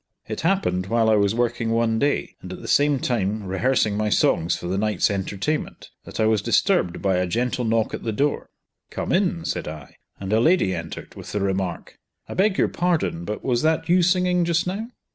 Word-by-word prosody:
It - - -4
happened 95 - 0
while 115 +1 +2
I - - +5
was 100 0 +2
working 120 -1 0
one 115 0 +1
day, 145 +3 0
and 90 - -9
at 95 - -7
the - - -7
same 145 0 +3
time 110 -5 -1
rehearsing 105 +3 +1
my 105 0 0
songs 85 -4 +2
for - - -8
the 95 +2 -1
night's 105 -2 +1
entertainment, 100 +9 -3
that - - -8
I 110 - +3
was 110 -2 +2
disturbed 90 -3 +1
by 95 -2 +2
a 90 0 0
gentle 125 +6 -1
knock 115 0 +1
at - - -4
the 115 - -2
door. 140 +7 -1 0.4
"Come - - -4
in!" 175 -3 +1
said - - -3
I, 75 -3 -9 0.2
and 100 +1 -3
a 110 - +4
lady 140 - +3
entered, 85 -2 -7
with - - -10
the 105 - 0
remark, 95 -3 -3 0.3
"I - - -6
beg 190 +1 +2
your - - +3
pardon, 165 - -1
but 105 +3 -5
was 120 -2 +1
that 160 +1 +1
you 180 +1 +5
singing 180 0 +2
just 170 0 +1
now?" 205 +6 -4
110 Hz, 210 wpm, -23 LUFS, 95-155 Hz, 0.4 s, I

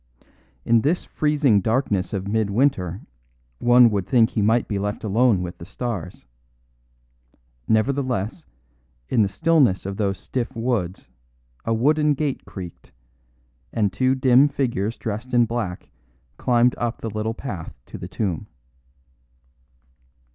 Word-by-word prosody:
In 115 -1 +4
this 160 +8 0
freezing 145 -9 +2
darkness 110 -5 0
of 100 -2 -3
mid 110 0 0
winter 100 - +1 0.6
one 120 -1 +6
would 100 -3 -1
think 115 -4 +4
he 110 - 0
might 110 +3 +2
be 100 -2 -2
left 105 +1 -3
alone 110 -2 +2
with 90 0 -7
the - - -9
stars. 100 - -5 1.4
Nevertheless, 125 - 0 0.6
in 115 - +3
the 100 - +2
stillness 145 - +2
of 100 0 -4
those 100 -3 0
stiff 120 +5 -4
woods 115 -6 -2 0.6
a 115 - +1
wooden 150 +5 +3
gate 140 -1 -2
creaked, 90 -4 -10 0.8
and 105 -3 0
two 130 0 +2
dim 130 +1 +5
figures 120 -6 -2
dressed 115 +3 -4
in 120 -1 +5
black 110 -6 -4 0.4
climbed 120 0 +3
up 120 0 -2
the 115 - -3
little 110 +2 -2
path 90 - -7
to - - -9
the - - -6
tomb. 95 -8 -3
115 Hz, 135 wpm, -23 LUFS, 100-130 Hz, 1.4 s, one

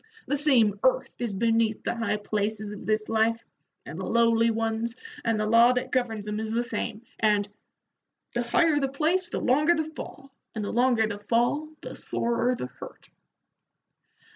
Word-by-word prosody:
The 285 - 0
same 245 -9 +3
earth 260 - +2
is 240 -3 -2
beneath 225 +1 +1
the - - -1
high 230 -2 -1
places 210 0 -3
of 205 - -10
this 215 0 0
life, 225 +1 +2 0.5
and 160 +5 -7
the - - -4
lowly 230 0 +3
ones, 225 +1 -1 0.3
and 225 -2 0
the 215 - 0
law 230 +3 +6
that 250 - -3
governs 225 -5 -1
'em 210 0 -2
is 220 0 -3
the 230 +2 0
same, 230 -2 -4 0.2
and 210 -2 +2 0.9
the 240 - 0
higher 295 +6 +2
the 275 -1 0
place 330 +6 0
the - - -3
longer 300 +7 +3
the 315 -1 -3
fall, 275 -2 -9 0.2
and 215 -2 -3
the - - -4
longer 240 -2 +3
the 205 -2 -4
fall 240 +8 0
the - - -8
sorer 235 +1 -1
the 125 - -5
hurt." - - -12
230 Hz, 175 wpm, -26 LUFS, 215-250 Hz, 0.9 s, law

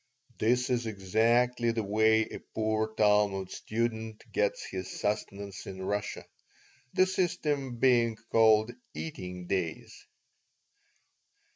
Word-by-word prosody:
This 125 +3 +2
is 120 -2 0
exactly 115 +4 +2
the 115 -1 0
way 110 +2 +3
a - - -7 0.2
poor 110 0 0
Talmud 105 -3 +2
student 110 -1 -3
gets 105 -1 0
his 95 -1 -6
sustenance 100 -1 -3
in 95 -1 -6
Russia, 100 +1 -3 0.7
the 185 - +5
system 150 -8 -1
being 120 -2 +3 0.2
called 110 0 +5 0.2
"eating 90 +3 -6
days." 90 -3 -3
110 Hz, 105 wpm, -30 LUFS, 100-120 Hz, 0.7 s, the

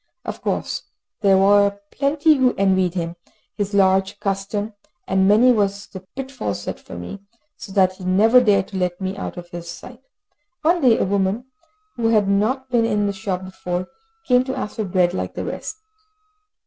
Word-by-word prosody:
Of - - -6
course - - -2 0.4
there 195 -2 +4
were 200 +1 +4
plenty 290 +3 +3
who 260 -3 +2
envied 190 -2 +2
him 170 -1 -3 0.4
his 205 0 -3
large 195 +1 +3
custom, 200 +2 -2 0.3
and 190 0 +2
many 225 +5 +6
was 200 -3 0
the 190 - -9 0.2
pitfall 265 - -4
set 100 - -6
for - - -11
me, 90 - -7 0.4
so 195 - -10
that 185 -1 +3
he 190 - -11
never 220 +7 +5
dared 200 -4 +2
to 195 - -5
let 180 -1 -1
me 190 0 -3
out 195 - -6
of 175 0 -9
his 170 -1 -7
sight. 250 +6 -10 0.6
One 340 +2 +3
day 245 -5 +5
a - - +1
woman, 200 +6 -1 0.5
who 230 -1 +1
had 215 -3 +3
not 245 +7 0
been 240 -2 +3
in 210 -2 +1
the 200 - -1
shop 190 -1 -4
before, 180 -1 -4 0.4
came 250 -1 +4
to 265 - -3
ask 210 - -5
for 215 - -1
bread, 180 -2 +2
like - - -4
the - - -4
rest. - - -5
200 Hz, 185 wpm, -21 LUFS, 190-230 Hz, 0.6 s, many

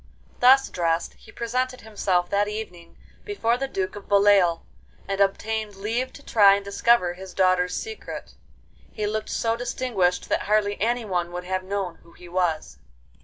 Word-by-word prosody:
Thus 265 +2 +6
dressed, 165 -1 -1
he 220 - -17
presented 255 +2 -2
himself 195 -5 0
that 205 +1 +2
evening 195 -6 -7 0.3
before 240 - 0
the 270 +2 -3
Duke 190 -7 -3
of 205 - -11
Beloeil, 200 -4 +4 0.4
and 195 0 -1
obtained 210 +1 0
leave 230 +6 -2
to 285 - -13
try 200 -4 +6
and 200 0 -5
discover 200 -2 +2
his 185 0 -11
daughters' 185 -1 +2
secret. 440 0 -7 0.6
He 210 - -3
looked 215 +1 -3
so 225 0 0
distinguished 230 -7 -1
that - - -1
hardly 205 -1 +1
anyone 210 -7 -1
would 180 0 -4
have 185 +1 -2
known 190 -2 -3
who 170 - -20
he 180 - -14
was. 170 - -1
200 Hz, 160 wpm, -24 LUFS, 180-225 Hz, 0.6 s, Thus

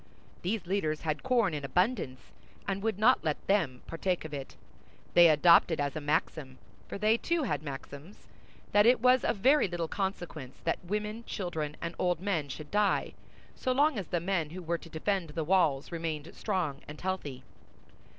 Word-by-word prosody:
These 190 +1 -2
leaders 170 -5 -1
had 155 -2 -2
corn 235 -8 +2
in 145 -2 -4
abundance, 175 - -1 0.4
and 195 -1 -1
would 220 -2 -1
not 240 +5 +4
let 155 -3 -2
them 160 -11 +1
partake 180 +1 -2
of 155 - -7
it; 140 -2 -6 0.6
they 175 -1 +8
adopted 160 +1 +5
as 145 0 -1
a 155 - -3
maxim—for 145 -2 -3
they, 215 +3 +3
too, 335 +5 0
had 150 - -1
maxims—that 155 +8 -3
it 250 - +5
was 250 +2 +4
of - - 0
very 270 +5 +4
little 175 -2 -3
consequence 175 -8 -4
that - - -1
women, 210 +4 -3
children, 160 -6 -4
and 170 0 -3
old 180 -2 +1
men 170 -7 -1
should 150 +2 -8
die, 205 0 +1 0.4
so 255 - -1
long 285 -2 +3
as 185 - -6
the 175 - 0
men 170 -3 -1
who 180 +3 -8
were 170 0 -1
to 165 - -13
defend 170 +2 -1
the 160 +2 -3
walls 155 -5 +2
remained 160 -2 -4
strong 180 -9 -2
and 150 +1 -9
healthy. 150 -9 -4
175 Hz, 170 wpm, -30 LUFS, 155-205 Hz, 0.6 s, they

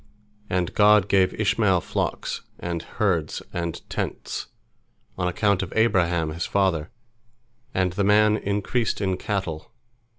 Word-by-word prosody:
And 90 0 -1
God 105 -1 +5
gave 95 -2 +2
Ishmael - - +3
flocks, - - -3 0.2
and 85 -1 -3
herds, 90 -6 -1
and 85 -1 -4
tents, - - -4 0.7
on 90 -1 -1
account 100 +2 +1
of 95 - -5
Abraham 90 -7 +2
his 85 +2 -3
father, 95 -5 +1 0.8
and 90 -2 0
the 100 - 0
man 105 +1 +5
increased 105 +3 -1
in 95 -2 0
cattle. 95 -5 -4
95 Hz, 125 wpm, -24 LUFS, 85-105 Hz, 0.8 s, God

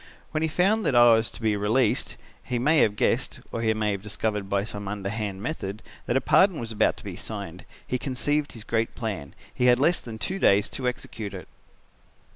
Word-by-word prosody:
When 155 - -1
he 160 - +1
found 195 +7 +2
that 130 - +1
I 120 -1 +8
was 110 0 +2
to - - -10
be 110 -1 +2
released, 105 +3 +1 0.3
he 125 - -2
may 150 +6 +3
have 105 -2 +3
guessed, - - 0
or 115 - -3
he 110 -1 +2
may 105 -1 0
have 100 -1 -3
discovered 105 -1 -3
by 100 0 +1
some 105 -1 -7
underhand 100 0 -4
method; 110 -8 -4 0.2
that 120 - +2
a - - +1
pardon 165 +6 +4
was 115 -1 -4
about 110 - +2
to - - -12
be - - -6
signed, - - -7 0.2
he 125 - -2
conceived 145 +3 -1
his 115 - -9
great 115 0 -1
plan. 100 - -5 0.2
He 125 - +2
had 120 0 +6
less 160 +7 +3
than 115 -2 -8
two 190 - -3
days 100 - +4
to 130 -2 -3
execute 110 -4 -5
it. 90 - -9
115 Hz, 215 wpm, -26 LUFS, 105-130 Hz, 0.3 s, I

